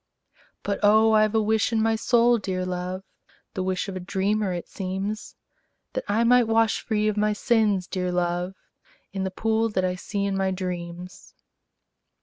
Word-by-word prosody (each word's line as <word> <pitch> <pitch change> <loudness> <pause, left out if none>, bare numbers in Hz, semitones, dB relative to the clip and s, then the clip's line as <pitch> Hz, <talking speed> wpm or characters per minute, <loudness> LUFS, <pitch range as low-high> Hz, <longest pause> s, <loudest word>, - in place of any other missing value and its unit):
But, 200 -1 -2
oh, 220 +2 +5
I 215 0 +5
've 215 - -6
a 220 - +4
wish 220 +2 +1
in 225 - +1
my 225 0 +2
soul, 235 +1 +3
dear 185 -2 -3
love, 185 +1 -4 0.5
(The 190 - -3
wish 185 +2 -1
of 195 - -5
a - - -3
dreamer, 195 +2 -1
it 175 -1 -4
seems,) 195 +2 -4 0.6
That - - -2
I 225 +3 +2
might 245 0 +5
wash 225 0 +2
free 215 -1 0
of 215 -1 -1
my 210 0 +2
sins, 210 -4 +1
dear 180 -1 -2
love, 175 +1 -1 0.6
In 190 -1 -2
the - - -1
pool 225 +3 0
that 185 -3 0
I 180 - 0
see 200 +2 -3
in 200 -1 -1
my 195 0 +1
dreams. 180 -1 -6
200 Hz, 180 wpm, -25 LUFS, 185-220 Hz, 0.6 s, oh